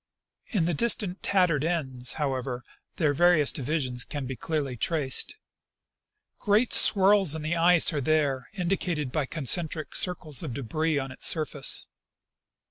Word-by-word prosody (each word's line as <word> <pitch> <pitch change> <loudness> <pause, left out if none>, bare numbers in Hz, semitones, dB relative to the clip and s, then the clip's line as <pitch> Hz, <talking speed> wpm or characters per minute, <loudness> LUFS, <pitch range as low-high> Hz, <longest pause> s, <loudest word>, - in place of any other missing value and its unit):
In 190 -8 -1
the 175 - -1
distant 200 -1 0
tattered 180 -7 +1
ends, 130 -7 -1
however, 130 -4 -4 0.3
their 150 -3 0
various 175 -1 +3
divisions 130 -3 -2
can 145 -3 -6
be 130 +1 -6
clearly 145 -3 -4
traced. 140 - 0 1.0
Great 215 +4 +1
swirls 195 -5 +4
in 160 - -6
the 155 +2 -2
ice~ 170 0 +4
are 145 - -2
there 140 -3 -1
indicated 175 -6 -3
by 150 -2 -2
concentric 155 +1 -1
curves 155 -7 +1
of 120 - -6
debris 155 +4 -2
on 135 -1 -4
its 130 - +1
surface. 150 -4 +1
155 Hz, 135 wpm, -26 LUFS, 135-175 Hz, 1.0 s, swirls